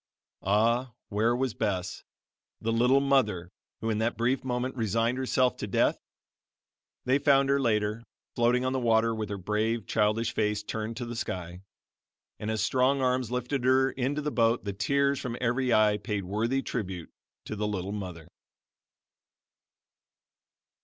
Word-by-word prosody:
Ah, 115 +5 +1
where 110 +4 +2
was 130 -2 -1
Bess, 95 -5 -2 0.6
the 115 - -1
"little 125 +4 +4
mother," 105 -11 +1 0.3
who 115 0 -1
in 105 - -1
that 115 +2 0
brief 125 +4 +1
moment 125 0 -2
resigned 115 +2 0
herself 130 -1 +1
to 105 - -4
death? 95 - +2 1.1
They 130 +2 +3
found 140 -1 +4
her 140 0 +3
later, 110 -2 0 0.3
floating 125 +1 +2
on 130 - 0
the 130 - 0
water 115 -1 +3
with 110 -2 -4
her 100 - -3
brave 105 +3 -1
childish 105 +1 +1
face 105 -1 0
turned 110 +1 -4
to 120 - -4
the 120 0 -6
sky; 90 -4 -5 0.8
and 105 - -4
as 110 -1 0
strong 130 +4 +2
arms 125 -2 +1
lifted 125 +2 -2
her 130 +1 +4
into 140 +3 -2
the 150 - -1
boat, 115 -1 +2
the 100 - -2
tears 140 +6 +1
from 120 -1 -4
every 125 +1 0
eye 105 -2 +4
paid 105 0 -3
worthy 115 +8 0
tribute 95 -7 -4 0.3
to 110 - -5
the 105 0 -1
"little 100 -2 -3
mother." 90 -6 -6
115 Hz, 155 wpm, -28 LUFS, 105-130 Hz, 1.1 s, little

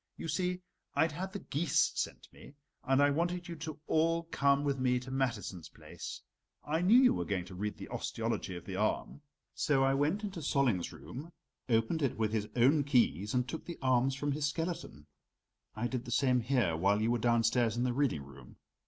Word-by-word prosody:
You - - -5
see, 180 +3 -1 0.3
I'd 160 0 +3
had 185 +5 -5
the 200 - -4
geese 155 -4 +1
sent - - -4
me, - - -14 0.3
and 135 +1 +3
I 145 - +4
wanted 175 +4 -1
you 170 - -5
to 155 -1 -6
all 165 +2 +2
come 140 -3 +2
with 140 -2 0
me 125 -1 +2
to 130 +1 -9
Mathiesen's 120 -10 -2
place. - - -9 0.4
I 155 +3 -1
knew 200 +7 +6
you 255 -1 +6
were - - -1
going 95 -4 -2
to 95 - -11
read 105 +3 -4
the - - -8
osteology 110 -5 -3
of 85 - -8
the 95 - -5
arm, 110 +7 -1 0.3
so 135 -3 +2
I 135 0 +3
went 150 +9 +1
up - - -18
into 195 -4 -4
Solling's 135 - +1
room, 125 - -9 0.4
opened 115 +8 +2
it 135 -6 0
with 110 -1 0
his 105 -1 -1
own 135 +5 +4
keys 120 - +2
and 125 0 +1
took 160 - -6
the 170 - -6
arms 130 0 +2
from 145 +1 -2
his 145 +1 0
skeleton. 165 - -4 0.7
I 110 +2 -2
did 125 +1 -3
the - - -7
same 130 -2 +3
here 120 -8 +1
while 100 +5 +2
you 110 +2 +1
were 120 - +1
downstairs 115 0 +2
in 120 - +1
the 125 -1 +1
reading 130 - 0
room. 70 -2 -14
135 Hz, 205 wpm, -32 LUFS, 115-155 Hz, 0.7 s, knew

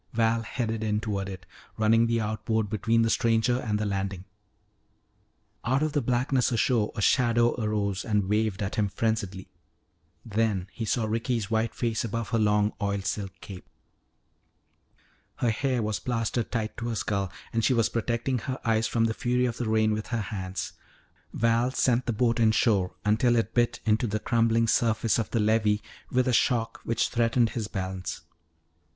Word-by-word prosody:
Val 115 0 +2
headed 115 -1 -3
in 105 -1 0
toward 100 -3 -3
it, 95 -2 -8 0.3
running 115 +1 +4
the 115 0 +1
outboard 110 0 -1
between 115 +1 +2
the 115 - +1
stranger 115 +2 +2
and 105 -4 -1
the 105 - -2
landing. 95 -2 -3 1.4
Out 130 +5 +1
of 155 - 0
the 145 - +1
blackness 125 0 +1
ashore 115 -2 +1
a 105 - -3
shadow 120 0 +3
arose 100 -3 -1
and 105 -4 0
waved 105 -1 0
at 100 +4 -4
him 105 -2 +1
frenziedly. 100 -2 -2 0.8
Then 105 -4 0
he 115 - -4
saw 110 +1 0
Ricky's 115 0 -1
white 110 +1 0
face 115 -2 -1
above 115 0 -3
her 115 -2 +1
long 105 0 +2
oil 100 -1 0
silk 100 0 -3
cape. 95 -3 -10 1.7
Her 120 - +1
hair 125 0 0
was 105 -1 -1
plastered 115 -1 -2
tight 110 -2 -2
to 120 - -4
her 115 - -2
skull 100 -3 -1 0.2
and 115 0 +1
she 130 - +3
was 115 -2 +3
protecting 120 +2 -1
her 130 +3 -4
eyes 110 0 +2
from 115 +1 +1
the 110 - 0
fury 125 +2 0
of 120 -2 -2
the 120 -3 -2
rain 110 0 +3
with 110 0 -2
her 120 -2 -1
hands. 95 -3 -5 0.6
Val 115 +2 +2
sent 130 -1 +1
the - - +2
boat 120 +2 +1
inshore 110 -4 +2
until 110 +3 +3
it 115 - 0
bit 120 -1 +1
into 110 +2 +2
the 110 +1 -1
crumbling 115 0 +2
surface 115 +1 +2
of 115 - -2
the 115 - 0
levee 105 -1 +2 0.3
with 130 0 +1
a 125 - +2
shock 115 -1 +1
which 115 -1 0
threatened 115 -1 +2
his 110 -4 -3
balance. 95 -5 -4
110 Hz, 175 wpm, -27 LUFS, 105-120 Hz, 1.7 s, running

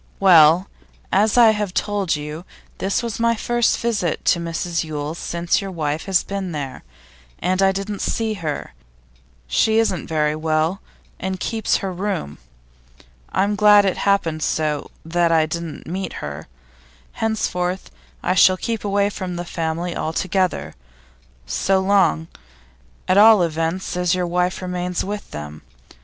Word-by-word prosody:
'Well, 175 -1 +6 0.4
as 210 +4 +3
I 230 -2 +8
have 210 -3 -3
told 200 -5 0
you, 150 +3 -6 0.4
this 195 +5 0
was 230 -2 -4
my 230 0 +2
first 240 +1 +1
visit 210 -8 -1
to 170 - +3
Mrs 170 0 -2
Yule's 155 +1 -5
since 170 +3 0
your 195 - -5
wife 155 -3 -3
has 190 -2 +2
been 195 -3 -4
there, 140 -3 -5 0.5
and 185 +1 0
I 195 0 +5
didn't 195 +1 -4
see 225 -1 -1
her; 150 -3 -4 0.7
she 220 - +2
isn't 210 -6 0
very 150 -1 0
well, 160 +4 0 0.4
and 190 0 -3
keeps 225 +1 0
her 190 - -3
room. 185 - -3 0.9
I'm 200 +2 +1
glad 205 -1 +6
it 190 - 0
happened 170 -6 +1
so 155 -2 -1 0.2
that 170 +1 +1
I 160 -1 +4
didn't 165 -1 -6
meet 185 +4 -4
her. 70 0 -7 0.6
Henceforth 185 -4 -2 0.3
I - - +1
shall 185 0 +5
keep 225 +2 -3
away 200 0 +1
from 185 -3 -5
the 175 0 -4
family 170 0 -3
altogether, 165 - -1 0.7
so 190 - +1
long, 190 -5 +2 0.8
at 185 +2 +4
all 215 -3 +7
events, 165 +3 -2
as 180 0 +1
your 180 -1 -1
wife 180 +2 -1
remains 180 -1 -2
with 205 +1 -5
them. 75 0 -8
180 Hz, 145 wpm, -21 LUFS, 160-200 Hz, 0.9 s, I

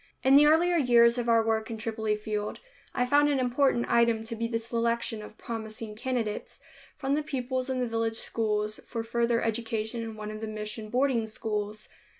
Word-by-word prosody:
In 265 +1 +6
the 295 +1 +8
earlier 340 +3 +4
years 240 -4 +5
of 240 -1 -1
our 230 -1 +4
work 220 -1 0
in 225 - -4
Tripoli 220 -1 -1
field, 210 0 -4 0.3
I 250 - 0
found 290 +3 +4
an 280 -2 +1
important 250 -1 +2
item 235 -1 +3
to 230 +1 -5
be 230 +1 -2
the 230 -1 -1
selection 230 -1 -1
of 210 0 -11
promising 220 -1 -6
candidates 230 -2 -3 0.4
from 270 0 -1
the 300 - +2
pupils 260 -3 -3
in 255 -1 -1
the 250 - 0
village 225 0 -1
schools 215 -2 -1
for 230 -1 -3
further 235 +1 +1
education 225 0 -2
in 225 -1 -6
one 215 0 -6
of 215 0 -7
the 220 - -3
mission 215 0 -5
boarding 250 -2 +1
schools. 215 -1 -4
230 Hz, 190 wpm, -28 LUFS, 220-250 Hz, 0.4 s, the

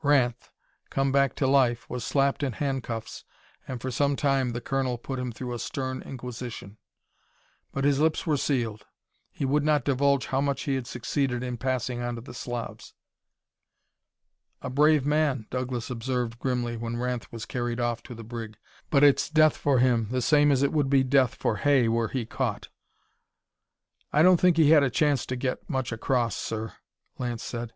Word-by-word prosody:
Ranth, 130 -5 +2 0.4
come 135 0 0
back 140 -1 +2
to 135 - 0
life, 130 -3 +2
was 125 -1 -5
slapped 140 0 +1
in 135 -4 -1
handcuffs, 130 -4 -4 0.4
and 125 - -5
for 130 +2 -4
some 140 +3 +1
time 135 -3 +1
the 120 0 -3
colonel 130 -1 -1
put 130 +2 -5
him 125 -1 -3
through 125 +2 -6
a 120 - -4
stern 130 0 -4
inquisition. 120 -5 -7 0.9
But 135 - -3
his 140 -1 +3
lips 155 +1 +1
were 155 - +2
sealed. 120 -7 -1 0.4
He 140 - -4
would 145 +2 +2
not 150 -3 +2
divulge 140 0 +2
how 135 0 0
much 140 -1 -1
he 140 - -1
had 130 -3 -2
succeeded 125 +1 -2
in 125 -1 -4
passing 125 0 -2
on 120 0 -3
to 115 - -7
the 120 - -11
Slavs. 120 -1 -6 1.7
"A 130 - -4
brave 150 +1 +4
man," 145 -5 +1
Douglas 125 -1 -3
observed 120 -1 -2
grimly 120 -2 -1
when 115 +1 -4
Ranth 125 -1 -3
was 115 -2 -6
carried 120 -1 -3
off 120 -1 -1
to 120 - -9
the 115 - -9
brig, 115 -1 -7 0.3
"but 140 -1 +4
it's 140 -1 +5
death 155 -1 +4
for 140 -2 +1
him, 120 -3 +3
the 125 0 -1
same 145 0 +4
as 135 -1 +2
it 140 - +1
would 145 -3 +1
be 135 -1 +4
death 130 -2 +3
for 110 - -1
Hay 140 -5 +3
were 115 0 +1
he 125 -2 -3
caught." - - -3 1.4
"I 150 - +4
don't 180 -1 +6
think 180 -2 +4
he 155 -2 +5
had 155 -2 +7
a 140 - +2
chance 145 +2 +1
to 130 - -2
get 130 +5 -3
much 130 -5 -2
across, 115 -2 0
sir," 110 0 -4 0.5
Lance 120 -2 -3
said. 120 -1 -5
130 Hz, 185 wpm, -27 LUFS, 120-140 Hz, 1.7 s, had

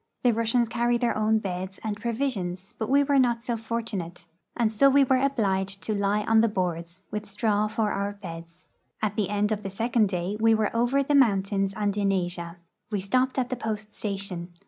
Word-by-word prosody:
The 245 -2 +4
Russians 230 +2 +2
carry 240 +1 +1
their 235 -1 0
own 215 +1 +2
beds 190 -2 -4
and 215 -2 -2
provisions, 210 -5 -3
but 220 - -2
we 280 +2 +5
were 280 -1 +3
not 235 -2 +2
so 240 -1 -1
fortunate, 220 -7 -4 0.3
and 230 -3 +2
so 275 +6 +5
were 270 -1 +4
obliged 195 -8 0
to 215 - -1
lie 205 +1 +1
on 220 +1 +4
the 230 - +4
boards, 175 -2 -3
with 210 0 -4
straw 210 0 +1
for 215 -1 -1
our 200 +1 -2
beds. 170 -3 -10 0.4
At 210 -1 0
the 205 -3 0
end 210 +1 0
of 210 -1 -1
the 195 - -5
second 225 +1 +1
day 185 +2 -2
we 225 0 +5
were 215 0 0
over 245 +4 +2
the 290 - -1
mountains 195 -6 +3
and 205 -2 0
in 200 -1 +1
Asia. 175 -2 -2 0.3
We 210 -2 -1
stopped 255 +8 0
at 250 -1 0
the - - 0
post 215 -2 -5
station. 195 -4 -4
210 Hz, 200 wpm, -26 LUFS, 195-235 Hz, 0.4 s, we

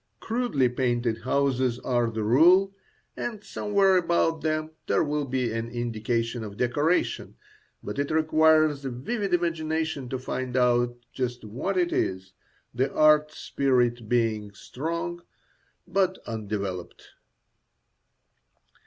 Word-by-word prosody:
Crudely 225 - 0
painted 120 -2 -1
houses 130 -2 +1
are 120 -2 +1
the 110 -1 -3
rule, 175 - +5 0.4
and 215 -3 -5
somewhere 200 -2 +2
about 170 -2 +1
them 155 0 -1 0.2
there - - +2
will 150 -1 -1
be 125 -3 -1
an 115 0 -3
indication 115 0 -2
of 100 -1 -8
decoration, 145 +8 0 0.5
but - - -5
it 140 - -1
requires 155 -2 +3
a 135 - -3
vivid 195 - -3
imagination 160 -5 -1
to 130 - -2
find 130 0 -4
out 120 -1 +2 0.2
just 125 -2 -3
what 130 - -3
it 175 -1 +1
is, 95 0 -2 0.4
the 130 +3 0
art 150 0 +4
spirit 125 -6 0
being 110 -4 0
strong 170 +9 -5 0.7
but 190 -1 +1
undeveloped. 100 -5 -5
130 Hz, 120 wpm, -26 LUFS, 120-160 Hz, 0.7 s, rule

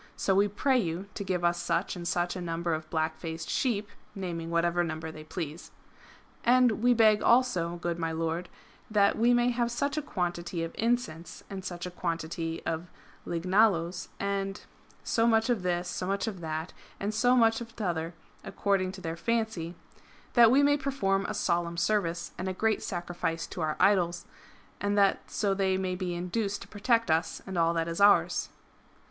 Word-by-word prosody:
So 195 - +1
we 200 +2 +4
pray 255 +6 +2
you 175 -2 -2
to 200 - -4
give 185 -2 -2
us 175 0 +1
such 170 +3 -1
and 175 -1 -5
such 175 +1 0
a 180 - -4
number 170 0 -2
of 155 0 -4
black 160 0 -1
faced 160 -1 -5
sheep," 215 -5 0 0.3
naming 170 -4 -4
whatever 170 +1 +2
number 160 -1 -4
they 155 -1 -10
please. 160 0 -6 0.4
" - - -22 0.3
And 245 -3 +4
we 245 +1 +4
beg 215 -2 +5
also, 195 -9 +3
good 175 0 -3
my 165 -1 -1
lord, 165 +2 -2 0.4
that 205 -2 +3
we 235 +2 +3
may 240 0 +3
have 240 -1 0
such 280 +5 -1
a - - +1
quantity 175 - -3
of 165 - -4
incense, 225 -9 -2
and 195 -1 -5
such 175 -1 -5
a 180 - -5
quantity 165 -1 -3
of 165 +2 -2 0.4
lignaloes, 180 0 +2
and 195 0 -2
" - - -31
— - - -32
so 230 0 +4
much 225 +1 +3
of 230 -5 0
this, 180 0 -1
so 180 - -3
much 195 0 0
of 210 -5 -4
that, 160 +1 -4 0.3
and 205 +2 -2
so 245 +3 +4
much 225 -1 +4
of 230 -1 -9
t'other, 170 -5 -2 0.3
accord 195 0 0
ing 185 0 -2
to 190 - -9
their 165 -2 -3
fancy 220 -4 -1 0.2
— - - -27
" - - -28
that 235 -2 +8
we 270 +4 +5
may 290 0 +4
perform 200 -9 0
a 210 - -3
solemn 170 -3 0
service 175 -3 0
and 185 - -3
a - - -2
great 220 +2 +1
sacrifice 175 -2 -3
to 175 - -7
our 155 -1 0
Idols, 175 -4 +3 0.5
and 205 0 0
that 200 -1 +2
so 200 -2 0
they 190 -1 +1
may 185 -1 -1
be 180 -1 -3
induced 195 +4 -2
to - - -15
protect 230 0 +1
us 160 +1 0
and 190 - -6
all 165 -1 +3
that 165 0 0
is 170 +3 -3
ours." 200 0 +4
185 Hz, 200 wpm, -29 LUFS, 170-215 Hz, 0.5 s, that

